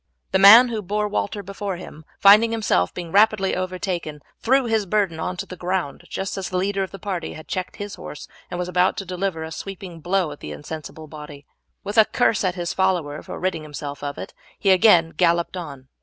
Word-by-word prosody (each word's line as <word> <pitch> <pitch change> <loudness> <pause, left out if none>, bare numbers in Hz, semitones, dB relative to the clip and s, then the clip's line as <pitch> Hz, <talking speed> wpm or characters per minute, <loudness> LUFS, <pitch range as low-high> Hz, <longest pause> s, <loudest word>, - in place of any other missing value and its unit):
The 190 - +3
man 225 +6 +9
who 225 -2 -3
bore 210 +2 -1
Walter 205 0 -3
before 200 0 -5
him, 160 -3 -11
finding 210 +3 +7
himself 210 - +1
being 175 -2 -7
rapidly 205 -1 +3
overtaken, 180 -5 -4 0.2
threw 265 +2 +2
his 220 -3 0
burden 190 -5 0
on 180 +3 -3
to - - -4
the 185 - -9
ground 175 -5 -3
just 195 0 -4
as 190 - -4
the 185 - -2
leader 195 +1 0
of 190 - -2
the 195 - -9
party 190 -5 -4
had 155 - -11
checked 185 -1 -4
his 205 0 -6
horse 150 - -9 0.2
and 175 - -5
was 180 0 -3
about 180 +1 +2
to 195 - -4
deliver 180 -2 -3
a 160 - -7
sweeping 190 0 -8
blow 180 0 0
at 145 - -10
the - - -7
insensible 155 +1 -8
body. 150 -2 -11 0.4
With 205 +3 +1
a 220 - +8
curse 230 -3 +1
at 185 -2 0
his 175 0 -3
follower 175 -6 0
for - - -8
ridding 185 -3 -1
himself 145 -1 -7
of 145 0 -4
it, - - -8 0.2
he 195 - +2
again 180 -4 +5
galloped 170 0 +1
on. 140 -7 -8
185 Hz, 215 wpm, -22 LUFS, 160-200 Hz, 0.4 s, man